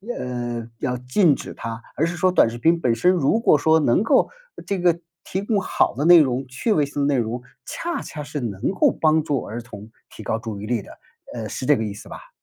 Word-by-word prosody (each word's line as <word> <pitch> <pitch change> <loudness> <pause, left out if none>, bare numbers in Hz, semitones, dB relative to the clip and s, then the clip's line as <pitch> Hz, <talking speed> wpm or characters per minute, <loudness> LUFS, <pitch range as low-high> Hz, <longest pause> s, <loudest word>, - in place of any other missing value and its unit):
呃， 120 -2 -4
要 125 -3 -1
禁 130 +6 +2
止 - - -8
它， 115 0 -6
而 155 - +1
是 170 +1 -3
说 185 +1 +2
短 180 - +4
视 115 - -7
频 165 +7 +3
本 125 -7 +1
身 180 +10 +3
如 180 +4 +2
果 230 - +4
说 160 +2 +3
能 145 - +2
够 225 - +3 0.4
这 200 -2 -1
个 175 -1 +2 0.2
提 190 - -3
供 205 0 0
好 195 - 0
的 140 +5 -1
内 175 0 +9
容、 135 -3 +1
趣 130 - -2
味 150 -8 +3
性 140 0 -2
内 140 -2 +2
容， 120 +1 -2 0.2
恰 345 0 -4
恰 150 - -7
是 145 0 -5
能 105 - -2
够 190 - +3
帮 155 0 +2
助 145 -4 -1
儿 115 +3 -6
童 110 -3 -11 0.2
提 - - -11
高 110 - -1
注 110 -3 -6
意 - - -6
力 115 0 -1
的， - - -13 0.4
呃， 115 -3 -5
是 - - -6
这 145 - +5
个 110 - -2
意 105 -2 -4
思 100 - -12
吧？ - - -11
140 Hz, 255 characters per minute, -22 LUFS, 120-165 Hz, 0.4 s, 内